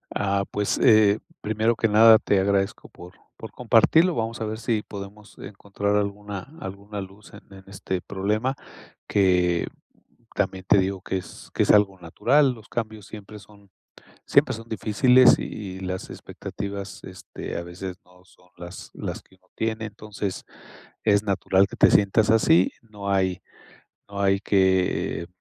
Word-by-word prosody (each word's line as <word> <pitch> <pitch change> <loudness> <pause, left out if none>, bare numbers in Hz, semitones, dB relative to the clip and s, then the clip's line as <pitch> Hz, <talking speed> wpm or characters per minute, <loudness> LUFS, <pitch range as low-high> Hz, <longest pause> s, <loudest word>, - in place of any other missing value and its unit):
Ah, 100 -1 0
pues, 105 -1 -1
eh, 110 -3 +5 0.2
primero 110 +2 0
que 115 - +1
nada, 110 +1 +7
te 100 - +1
agradezco 100 0 -1
por 90 +1 -13 0.2
por 110 -2 -9
compartirlo, 140 +9 +3
vamos 115 0 -3
a - - -1
ver 110 +1 -4
sí 110 -2 -1
podemos 100 +1 -10
encontrar 100 0 -3
alguna 105 +4 -4
alguna 100 +2 -7
luz 95 +2 -11
en - - -11
en 95 0 -13
este 95 -2 -4
problema, 105 +7 -2 0.5
que 90 -3 +2 0.7
también 95 -2 -2
te - - +5
digo 95 0 -1
que 95 - -3
es 90 - -12
que - - +2
es - - +3
algo 100 -2 +3
natural, 135 - +2
los 115 -2 -15
cambios 110 -3 -5
siempre 105 0 -11
son 100 -1 -20 0.5
siempre - - +3
son 115 0 -11
difíciles 120 +4 +4
y 95 -3 -6
las 95 0 -5
expectativas, 100 -1 -7
este, 95 0 -9
a - - -3
veces 90 +1 -7
no 90 0 -23
son 90 0 -25
las 85 +1 -10
las - - -5
que 95 - -25
uno 95 0 -34
tiene, 110 0 -2
entonces, 105 -2 -6 0.6
es 100 -2 +3
natural 95 -1 +2
que - - -10
te - - +5
sientas 105 +1 +3
así, 95 -5 +4
no 105 -3 -8
hay 95 -2 0 0.7
no 100 0 -6
hay 100 0 +2
que, 95 -4 +1
eh, - - -8
100 Hz, 160 wpm, -24 LUFS, 95-110 Hz, 0.7 s, nada